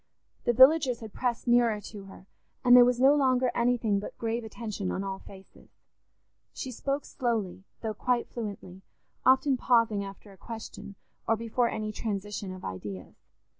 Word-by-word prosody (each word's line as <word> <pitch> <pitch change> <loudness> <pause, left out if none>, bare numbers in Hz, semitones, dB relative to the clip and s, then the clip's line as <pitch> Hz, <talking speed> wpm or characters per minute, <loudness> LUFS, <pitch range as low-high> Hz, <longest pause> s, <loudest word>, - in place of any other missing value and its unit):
The 240 - +3
villagers 260 -1 +5
had 220 -2 -9
pressed 245 -1 -2
nearer 240 -3 +3
to 205 -1 -10
her, 195 -1 -13 0.4
and 245 0 +8
there 250 - +10
was 245 0 +2
no 270 +2 +6
longer 255 -3 +2
anything 235 -4 +1
but 205 - -8
grave 230 +1 -2
attention 215 -3 -5
on 190 - -3
all 195 -1 -4
faces. 195 -1 -15 0.9
She 260 - -5
spoke 275 +4 -3
slowly, 220 -7 -3 0.2
though 220 -1 -3
quite 245 +3 0
fluently, 200 -5 -7 0.5
often 265 +1 +4
pausing 230 -5 +2
after 200 +1 -10
a 195 - -16
question, 220 0 -9 0.3
or 225 - +3
before 230 +2 0
any 215 -1 -3
transition 205 -2 -4
of 185 -1 -9
ideas. 95 0 -7
225 Hz, 160 wpm, -28 LUFS, 200-245 Hz, 0.9 s, there